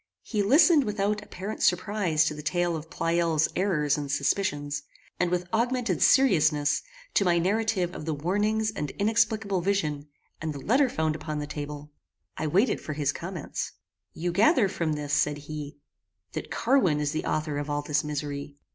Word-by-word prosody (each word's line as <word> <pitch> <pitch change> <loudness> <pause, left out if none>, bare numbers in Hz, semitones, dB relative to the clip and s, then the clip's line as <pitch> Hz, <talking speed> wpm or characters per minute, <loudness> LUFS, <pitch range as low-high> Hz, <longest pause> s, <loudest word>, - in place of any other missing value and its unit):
He 215 -4 -1
listened 300 - +5
without 210 -1 -1
apparent 195 +4 -7
surprize 180 -4 +2
to - - 0
the 150 - -7
tale 175 +2 0
of 160 0 -7
Pleyel's 165 -2 +1
errors 150 -7 +1
and 140 -1 -4
suspicions, 145 -1 0 0.4
and 180 - +2
with 180 0 -1
augmented 235 -4 0
seriousness, 155 - +4 0.3
to - - +3
my 175 -2 +3
narrative 190 -1 +1
of 155 - -7
the 160 - -1
warnings 210 +7 0
and 150 -8 -4
inexplicable 215 -2 +1
vision, 155 -7 -1 0.3
and 155 -1 -2
the 140 - -7
letter 260 - +3
found 160 -6 0
upon 155 0 -4
the 150 - -3
table. 145 0 -7 0.4
I 155 - -2
waited 195 - +2
for 155 - -5
his 145 -1 0
comments. 170 -3 -5 0.4
"You 175 +2 -3
gather 220 - +4
from 170 -4 -1
this," 150 -1 -4
said 150 0 +2
he, 145 0 -7 0.5
"that - - -5
Carwin 220 - +2
is 150 -1 0
the 155 - -3
author 150 -2 -1
of 145 +1 -4
all 145 0 -1
this 145 +1 0
misery." 145 -1 -4
165 Hz, 170 wpm, -27 LUFS, 150-205 Hz, 0.5 s, listened